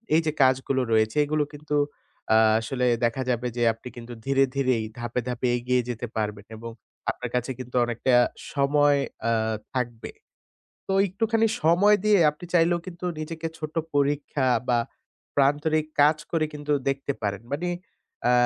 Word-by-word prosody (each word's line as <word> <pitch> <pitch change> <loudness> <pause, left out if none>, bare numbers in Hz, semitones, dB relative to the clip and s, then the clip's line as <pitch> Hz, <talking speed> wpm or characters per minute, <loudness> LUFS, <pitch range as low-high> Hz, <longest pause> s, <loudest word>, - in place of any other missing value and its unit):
এই 160 - +5
যে 155 - +1
কাজগুলো 130 0 +2
রয়েছে 110 +4 +2
এগুলো 150 0 +1
কিন্তু 150 0 -4 0.6
আ - - +7 0.2
আসলে 125 +2 -2 0.2
দেখা 115 +3 -1
যাবে 125 0 0
যে 120 - +1
আপনি 115 +3 -12
কিন্তু 120 0 -8
ধীরে, 135 0 +3
ধীরে 135 -2 +2
এই 110 - -4
ধাপে, 120 +1 -2
ধাপে 125 +1 -1
এগিয়ে 125 +1 +1
যেতে 120 0 -4
পারবেন 105 -1 -3
এবং 115 +1 -7 0.4
আপনার 125 - -4
কাছে 125 +2 -1
কিন্তু 125 0 -8
অনেকটা 120 +2 0 0.4
সময় 145 0 +3 0.3
আ - - +2 0.4
থাকবে। 120 -3 -3 0.8
তো - - -2 0.2
একটুখানি 225 +4 +1 0.2
সময় 180 +6 +5
দিয়ে 210 -1 +5
আপনি 150 +4 -11
চাইলেও 175 0 +4
কিন্তু 180 0 -7
নিজেকে 160 +1 -4
ছোট 155 -1 -6 0.2
পরীক্ষা 140 -1 +1 0.2
বা 120 - +4 0.6
প্রান্তরিক 150 +3 +2 0.2
কাজ 150 +2 +5
করে 160 -2 +1
কিন্তু 150 0 -2 0.2
দেখতে 135 +1 -2
পারেন। 100 -1 -2
মানে, 170 +5 -1 0.6
আ - - +5
140 Hz, 155 wpm, -25 LUFS, 125-155 Hz, 0.8 s, আ